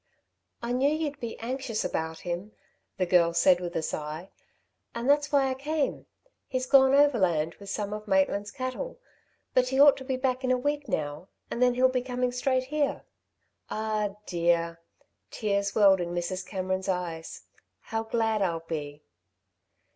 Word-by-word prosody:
"I 235 - -2
knew 260 +3 +3
you'd 300 -2 -2
be 235 -3 -6
anxious 240 -1 -3
about 160 0 -3
him," 180 +4 -4 0.4
the 185 - +1
girl 170 -1 +3
said 175 +1 +5
with 175 -1 -5
a 160 - 0
sigh, 155 +4 -5 0.6
"and 235 +2 -3
that's 290 +1 +3
why 280 -2 +4
I 260 - 0
came. 290 +2 -2 0.4
He's 255 -1 -2
gone 265 0 +6
overland 185 - +3
with 200 -1 -10
some 205 +1 -3
of 215 0 -6
Maitland's 200 +1 +2
cattle; 255 - -5 0.6
but 250 0 +3
he 265 +1 0
ought 285 0 +8
to 265 - -8
be 260 -1 -2
back 255 0 -1
in 255 - 0
a 255 - +3
week 290 +2 -2
now, 150 -2 -3 0.2
and 235 - -3
then 250 -1 +4
he'll 255 +1 +5
be 255 -1 0
coming 250 0 -1
straight 255 +1 +1
here." 290 +2 -1 0.7
"Ah, 215 -2 -1
dear!" 170 -1 +1 0.5
Tears 200 -2 -1
welled 195 -3 +6
in 175 0 -3
Mrs. 180 +2 -2
Cameron's 185 -1 -2
eyes. 170 -3 -4 0.4
"How 225 -1 -3
glad 225 -1 0
I'll 170 -4 0
be." 150 -2 -5
215 Hz, 165 wpm, -28 LUFS, 180-260 Hz, 0.7 s, ought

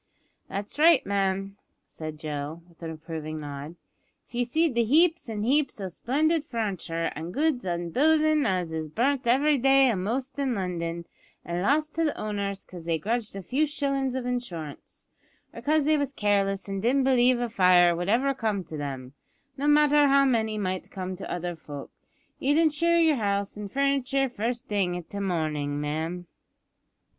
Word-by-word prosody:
"That's 200 +8 -5
right, 325 -2 +6
ma'am," 195 0 -1 0.3
said 155 -1 -8
Joe, 150 +1 -5
with 170 -1 -24
an 165 - -5
approving 155 -1 -6
nod. 145 +2 -7 0.5
"If - - -27
you 245 0 0
seed 315 +4 +1
the 235 0 +2
heaps 320 +4 +3
an' 210 -2 -3
heaps 275 +1 +1
o' 190 -2 -4
splendid 300 - 0
furnitur' 190 - -3
an' 160 +3 -5
goods 290 - 0
an' 170 -1 -2
buildin's 310 - +3
as 180 -4 -1
is 160 -1 -3
burnt 260 - 0
every 280 +4 +3
day 270 0 +5
a'most 235 +8 -3
in 265 -3 0
London, 170 -3 -3 0.4
an' 170 +1 -2
lost 300 +8 +1
to 330 - 0
the 300 - -1
owners 200 -2 -3
'cause 175 -3 -11
they 165 -1 +1
grudged 220 +6 -2
the 195 -1 -7
few 280 - +1
shillin's 275 -3 -1
of 260 -1 -3
insurance, 180 - -6 0.5
or - - -8
'cause 305 0 +2
they 305 0 +3
was 285 -1 -2
careless 200 -3 0
an' 195 0 -3
didn't 255 +6 +2
b'lieve 255 -1 +4
a 240 - -1
fire 180 -5 +5
would 175 +2 -3
ever 265 +5 +2
come 215 -6 -2
to 160 -2 -8
them, 135 -3 -6 0.4
no 285 +2 -2
matter 295 -1 +5
how 275 0 +5
many 220 -4 +1
might 185 -2 -3
come 185 -1 -5
to 190 - -7
other 175 0 -3
folk, 145 -3 -9 0.5
you'd 290 +3 +2
insure 330 +1 +3
yer 320 -4 +4
house 200 -2 -1
an' 205 -1 -6
furnitur' 275 +1 +1
first 235 +1 -3
thing 195 -4 0
i' 175 -2 -6
the 200 - -5
mornin', 155 -6 -1
ma'am." 160 +4 -3
210 Hz, 175 wpm, -26 LUFS, 175-275 Hz, 0.5 s, right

